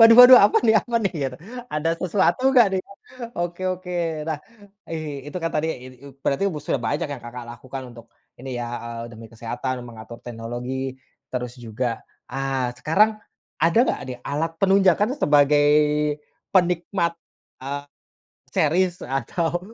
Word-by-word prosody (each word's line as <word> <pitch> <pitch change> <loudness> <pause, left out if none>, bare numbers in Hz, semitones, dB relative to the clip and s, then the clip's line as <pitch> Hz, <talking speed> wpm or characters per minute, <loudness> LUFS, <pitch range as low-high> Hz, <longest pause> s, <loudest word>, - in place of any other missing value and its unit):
Waduh-waduh 245 +3 +11
apa 205 - +4
nih 225 -1 +5
apa 240 - -7
nih, 195 - +1 0.2
gitu. 125 - -10 0.4
Ada 150 +2 0
sesuatu 190 +6 +2
gak 240 -3 +8
nih? 190 - +1 0.6
Oke 175 +1 -3
oke. 180 0 -6 0.4
Nah 155 -2 -1 0.5
i 150 -4 -5
itu 150 - -5
kan 165 - 0
tadi 155 +1 +1
i 125 -4 -9 0.2
i - - -10 0.2
berarti 140 +7 +1
bu 150 - -5
sudah 140 -2 -1
banyak 110 - -1
yang 135 -4 -6
Kakak 120 +1 -7
lakukan 130 +3 -8
untuk 115 -1 -13 0.3
ini 130 +1 -7
ya, 120 - -3 0.2
eee, 115 0 -5
demi 115 0 -11
kesehatan, 120 +3 -4
mengatur 115 0 -10
teknologi, 125 +3 -5 0.4
terus 125 -1 -4
juga 120 +1 -3 0.4
ah, 135 -1 -1
sekarang 210 - +2 0.4
ada 165 +5 +3
nggak - - -1
nih 125 -1 -5
alat 155 +4 -1
penunjang 195 -2 +5
karna 220 +6 +1
sebagai 145 0 +5 0.9
penikmat, 175 -1 +2 0.5
eee, 140 +1 -4 0.7
series 175 +3 +2
atau 160 +7 -1
145 Hz, 150 wpm, -23 LUFS, 125-180 Hz, 0.9 s, Waduh-waduh